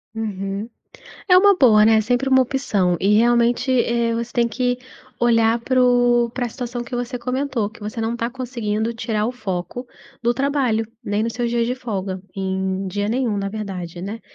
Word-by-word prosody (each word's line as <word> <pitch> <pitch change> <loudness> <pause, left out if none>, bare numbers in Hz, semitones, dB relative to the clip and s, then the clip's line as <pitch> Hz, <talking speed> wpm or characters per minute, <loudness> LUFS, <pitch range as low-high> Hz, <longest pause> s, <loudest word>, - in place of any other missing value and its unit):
Uhum. 200 -1 -4 0.6
É 360 - +7
uma 400 +2 +6
boa, 220 - +6
né, 220 0 +5
sempre 245 +4 0
uma 260 0 +6
opção. 210 -9 +1
E 205 +2 +3
realmente, 240 +2 +2
eh, 235 -2 +1
você 235 +1 -4
tem 235 -1 +2
que 245 +2 -1 0.4
olhar 230 -1 +3
para 255 +2 0
o 245 -1 +3
pra 245 0 -3
situação 240 0 -5
que 245 +1 -5
você 245 +1 -3
comentou, 250 -2 -2
que 225 +2 -17
você 215 +2 -5
não 225 +1 -1
tá 235 0 -2
conseguindo 235 -3 -3
tirar 220 -2 -1
o 245 - -2
foco 205 +1 -5 0.4
do 235 - +2
trabalho. 260 -4 0 0.2
Nem 205 +1 0
nos 230 0 -2
seus 240 -1 -1
dias 235 -1 +1
de 250 - -1
folga, 200 -7 -4 0.2
em 190 0 -2
dia 205 +3 -2
nenhum, 240 -4 0
na 195 0 -2
verdade, 185 -5 -6
né. 205 +5 -6
235 Hz, 185 wpm, -21 LUFS, 210-245 Hz, 0.6 s, É